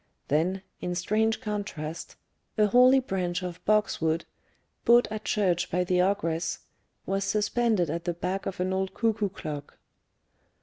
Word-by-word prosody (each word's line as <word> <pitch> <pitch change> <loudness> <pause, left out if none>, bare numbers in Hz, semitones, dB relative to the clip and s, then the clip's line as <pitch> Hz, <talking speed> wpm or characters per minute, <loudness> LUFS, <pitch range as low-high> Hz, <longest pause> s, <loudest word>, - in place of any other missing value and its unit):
Then, 180 +6 +1 0.2
in 180 0 -3
strange 220 +5 +1
contrast, 200 -8 -5 0.4
a 215 - +5
holy 250 +5 +6
branch 185 -6 -2
of 180 -1 -6
boxwood, 165 -6 +1 0.6
bought 240 +1 +6
at 215 -1 -5
church 185 -5 +1
by 180 +1 +1
the 180 0 +2
ogress, 170 -3 0 0.5
was 195 +1 -1
suspended 210 -1 +1
at 170 +1 -4
the 175 - 0
back 185 +3 -3
of 190 - -5
an 185 +1 0
old 190 0 -2
cuckoo 220 -3 +1
clock. 150 -6 -7
190 Hz, 140 wpm, -27 LUFS, 175-210 Hz, 0.6 s, holy